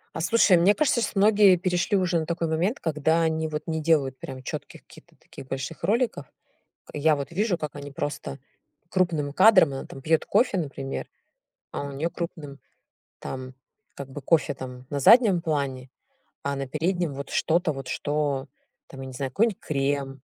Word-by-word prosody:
А, 165 - -3
слушай, 185 0 +4
мне 185 +5 +5
кажется, 265 -2 +1
щас 215 - -2
многие 205 -1 +6
перешли 180 +2 0
уже 180 -2 +1
на 160 - -3
такой 170 0 -2
момент, 175 - 0
когда 160 +1 +1
они, 160 -1 0
вот, 155 0 -4
не 160 -1 -2
делают, 145 -5 +2
прям, 130 -1 -8
чётких - - -7
каких-то - - -18
таких 135 - -13
больших 135 +5 -5
роликов. 220 - 0 0.6
К - - -14
я, 155 +1 +3
вот, 140 -2 -5
вижу, 195 +1 0
как 150 -1 -5
они 145 0 -8
просто 140 - -5 0.5
крупным 160 -6 0
кадром, 185 -2 +6
она, 135 - -5
там, 135 - -11
пьёт 160 +3 +1
кофе, 235 -5 +2
например, 135 -5 -4 0.7
а - - -3
у 140 - -6
неё 145 +5 -2
крупным 150 -5 -7 0.6
там, 130 0 -7 0.4
как 140 -1 -8
бы, 145 - -7
кофе, 155 +1 +2
там, 125 -1 -9
на 140 - -1
заднем 205 - +6
плане, 140 -5 -2 0.5
а 140 0 -1
на 135 0 -4
переднем 165 +2 -1
вот 140 0 -7
что-то 170 0 +1
вот, 135 -2 -7
что 145 -2 -2 0.4
там, 135 - -10
я 135 - -6
не 130 - -9
знаю, 135 0 -4
какой-нибудь 215 - +1
крем. 140 -1 -1
155 Hz, 180 wpm, -25 LUFS, 140-175 Hz, 0.7 s, многие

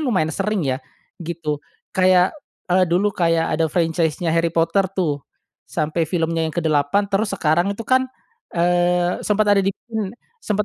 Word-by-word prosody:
lumayan 185 - 0
sering, 210 -6 -1
ya, 130 0 -1 0.4
gitu. 160 -3 -3 0.3
Kayak, 185 -1 +4 0.4
eee, 185 -1 +4
dulu 195 +4 +2
kayak 165 -2 +1
ada 160 0 +1
franchise-nya 165 0 0
Harry 165 0 +2
Potter, 170 +4 +1
tuh, 150 -6 0 0.5
sampai 155 +1 -1
filmnya 165 -1 0
yang - - -8
ke-8 155 +4 +2
terus 205 +2 0
sekarang 170 +5 +2
itu, 230 - -6
kan, 260 0 +2 0.5
eee, 175 +1 +2
sempat 210 0 +1
ada 200 - +4
di 195 - 0
pin 220 0 -4 0.3
sempet 210 - -1
175 Hz, 150 wpm, -21 LUFS, 160-195 Hz, 0.5 s, Kayak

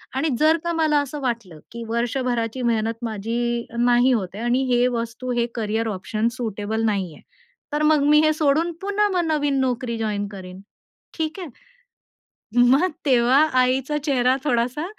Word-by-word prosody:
आणि 295 +4 0
जर 315 +2 +4
का 340 - -1
मला 310 -2 +2
असं 285 +1 -6
वाटलं 230 - -4
की 235 0 -7
वर्षभराची 240 0 -1
मेहनत 230 0 -1
माझी 235 +2 -2
नाही 245 +1 +4
होत 195 -7 -1
आहे 220 - -5
आणि 245 +2 +1
हे 245 0 +3
वस्तू, 240 +1 -4
हे 235 -1 +1
कॅरियर 225 0 -1
ऑप्शन 215 +3 -2
सुटेबल 220 -2 -3
नाहीये, 190 -8 -2 0.5
तर 300 - 0
मग 305 -2 +4
मी 300 - +6
हे 310 - +3
सोडून 310 +2 +1
पुन्हा 405 +1 +1
मग 355 -2 +1
नवीन 290 -3 0
नोकरी 245 -2 -2
जॉइन 210 -2 -2
करीन, 185 -1 -10 0.6
ठीक 320 +3 -3
आहे?" 350 -4 -6 1.2
मग 295 +9 +4 0.2
तेव्हा 255 +1 +4 0.2
आईचा 265 +3 0
चेहरा 255 -3 +2
थोडासा 250 +3 0
245 Hz, 155 wpm, -22 LUFS, 225-290 Hz, 1.2 s, मी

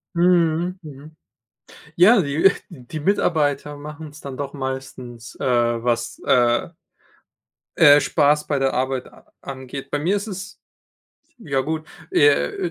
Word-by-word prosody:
Mhm, 175 0 +2
mhm. 150 +1 -12 0.8
Ja, 195 +4 +6
die, 145 +4 -2
äh 195 - +9 0.2
die 155 -1 -9
Mitarbeiter 150 -5 0
machen's 150 +1 -10
dann 135 -2 -8
doch 140 0 -5
meistens, 130 -3 -7
äh - - -2 0.4
was, 120 -1 -1
äh 120 +2 +2 1.1
äh, 145 -3 +7
Spaß 150 -1 +2
bei 145 - 0
der 135 0 0
Arbeit 130 0 -2
a - - -21
angeht. 135 0 -8
Bei 145 - -1
mir 180 +7 0
ist 200 +2 -4
es 195 -1 -8 0.8
ja 140 - -2
gut, 155 +2 -4 0.2
äh, 390 -1 +2
145 Hz, 130 wpm, -21 LUFS, 135-170 Hz, 1.1 s, äh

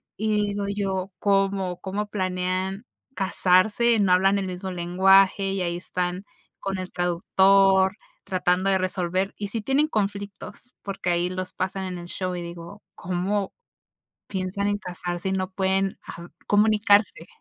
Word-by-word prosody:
Y 210 0 0
digo 200 0 -2
yo, 195 -1 -2
¿cómo 195 -2 +1
cómo 205 +2 -3
planean 185 +1 -2 0.3
casarse, 200 +5 +3
no 195 -3 +3
hablan 195 +2 +4
el 190 -1 -2
mismo 185 +1 -5
lenguaje, 190 +3 +4
y 195 -1 -2
ahí 170 -1 -1
están 180 +1 -3 0.3
con 195 -1 -3
el 185 0 -6
traductor 190 +2 +3 0.3
tratando 185 +1 +1
de 190 - +4
resolver, 185 +1 -1
y 205 -1 -4
sí 225 +1 -3
tienen 270 +6 +2
conflictos 205 +2 -4
porque 195 -2 -4
ahí 175 +1 +1
los 185 0 -5
pasan 190 +1 -3
en 180 -1 -5
el 175 0 -8
show 185 0 -3
y 175 - -4
digo, 170 +3 -9
¿cómo 185 +3 -2 0.8
piensan 195 +1 -2
en 205 - 0
casarse 180 -1 -4
y - - -1
no 185 -1 -2
pueden 190 0 0
hab 170 +1 -9 0.2
comunicarse? 210 -1 +3
190 Hz, 150 wpm, -24 LUFS, 180-200 Hz, 0.8 s, hablan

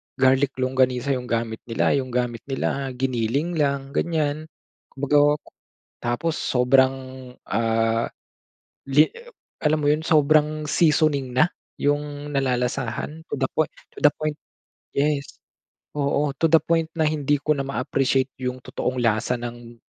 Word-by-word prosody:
garlic 135 +1 +3
longganisa 130 +1 +1
yung 125 -1 -5
gamit 115 -1 -2
nila, 115 - +1
yung 130 - -2
gamit 120 -1 -1
nila, 135 0 -2
giniling 135 +6 -1
lang 140 -1 0
ganyan, 155 -2 0 0.5
kumbaga. 145 +2 +3 0.7
Tapos 120 +7 -1
sobrang, 130 +1 +3 0.6
ah, 115 0 +1 0.8
li 150 +3 +5 0.5
alam 155 0 +3
mo 145 - +2
yun 150 +1 +1
sobrang 155 0 +3
seasoning. 150 -5 +2
Na 155 +7 +4 0.3
yung 145 0 -1
nalalasahan, 125 +3 -1
to - - 0
the 130 - +1
point 155 - +2 0.2
to - - -10
the 145 - +7
point, 155 -1 -2 0.6
yes, 145 -1 -1 0.5
oo, 145 0 +1
to - - +2
the 160 - +7
point 165 -1 +1
na 160 - +2
hindi 145 -1 +1
ko 150 +1 +2
na 135 - -2
ma-appreciate 135 0 0
yung 125 0 -3
totoong 130 0 -3
lasa 115 +2 +1
ng, 120 0 -8
140 Hz, 130 wpm, -23 LUFS, 125-150 Hz, 0.8 s, the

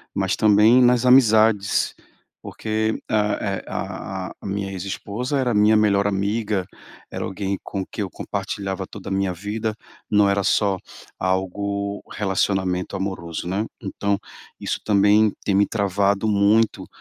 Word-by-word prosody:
mas 95 0 0
também 110 +3 +5
nas 125 0 +4
amizades, 110 -5 +4 0.5
porque 110 0 -2
a 105 -1 +2
e 100 -2 -2
a 95 -2 -5
a - - -12
minha 100 0 -3
ex 95 -1 -5
esposa 115 +7 -3
era 125 -3 +1
minha 105 +1 +5
melhor 100 -1 +3
amiga, 100 0 -1 0.5
era - - -4
alguém 95 0 -3
com 95 -2 -4
quem 105 - -6
eu 100 - -2
compartilhava 95 0 -4
toda 100 - -9
a - - -5
minha 95 -1 0
vida, 105 +4 -3 0.3
não 105 -1 +4
era 100 0 +1
só 100 0 +2 0.4
algo 100 +2 -2
relacionamento 95 -2 -1
amoroso, 95 -4 -4
né. 100 +4 -1 0.2
Então, 100 -1 -1 0.4
isso - - -3
também 105 +1 +4
tem 100 - 0
me 100 +1 +5
travado 100 -1 0
muito 105 +2 +2
100 Hz, 140 wpm, -22 LUFS, 95-110 Hz, 0.5 s, também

